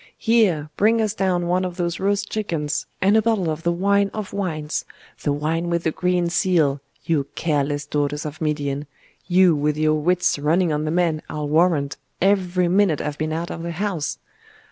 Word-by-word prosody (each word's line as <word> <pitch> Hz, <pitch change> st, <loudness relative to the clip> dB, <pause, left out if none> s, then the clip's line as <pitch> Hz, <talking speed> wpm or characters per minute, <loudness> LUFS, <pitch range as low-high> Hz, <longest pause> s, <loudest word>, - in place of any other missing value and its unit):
'Here! 195 Hz, -, +2 dB
bring 225 Hz, +3 st, +3 dB
us 215 Hz, -2 st, +1 dB
down 185 Hz, -4 st, 0 dB
one 180 Hz, +2 st, +1 dB
of 180 Hz, -1 st, -4 dB
those 170 Hz, -1 st, -2 dB
roast 200 Hz, +1 st, 0 dB
chickens, 165 Hz, -9 st, -2 dB, 0.2 s
and 200 Hz, +3 st, +4 dB
a 220 Hz, -, +5 dB
bottle 210 Hz, -7 st, +1 dB
of 155 Hz, +1 st, -4 dB
the 170 Hz, -, +1 dB
wine 200 Hz, +3 st, +2 dB
of 215 Hz, -3 st, -5 dB
wines 160 Hz, -6 st, -2 dB, 0.4 s
the 145 Hz, -, 0 dB
wine 160 Hz, +4 st, -1 dB
with 170 Hz, -1 st, 0 dB
the 160 Hz, -, +1 dB
green 180 Hz, 0 st, 0 dB
seal, 165 Hz, -5 st, +2 dB, 0.2 s
you 150 Hz, -4 st, 0 dB
careless 145 Hz, -2 st, -1 dB
daughters 145 Hz, +1 st, -2 dB
of 150 Hz, +1 st, -7 dB
Midian, 145 Hz, -2 st, -2 dB, 0.4 s
you, 180 Hz, -2 st, +5 dB
with 150 Hz, +1 st, 0 dB
your 155 Hz, 0 st, +2 dB
wits 170 Hz, +1 st, +1 dB
running 160 Hz, +3 st, +2 dB
on 150 Hz, +1 st, -1 dB
the -, -, -1 dB
men, 165 Hz, -2 st, +1 dB
I'll 150 Hz, -1 st, -3 dB
warrant, 155 Hz, -2 st, +2 dB, 0.2 s
every 185 Hz, -2 st, +2 dB
minute 180 Hz, -4 st, +3 dB
I've 150 Hz, -1 st, -4 dB
been 155 Hz, 0 st, -1 dB
out 165 Hz, +2 st, -3 dB
of 165 Hz, -, -6 dB
the 170 Hz, 0 st, -4 dB
house! 175 Hz, -5 st, -2 dB
170 Hz, 190 wpm, -22 LUFS, 150-185 Hz, 0.4 s, a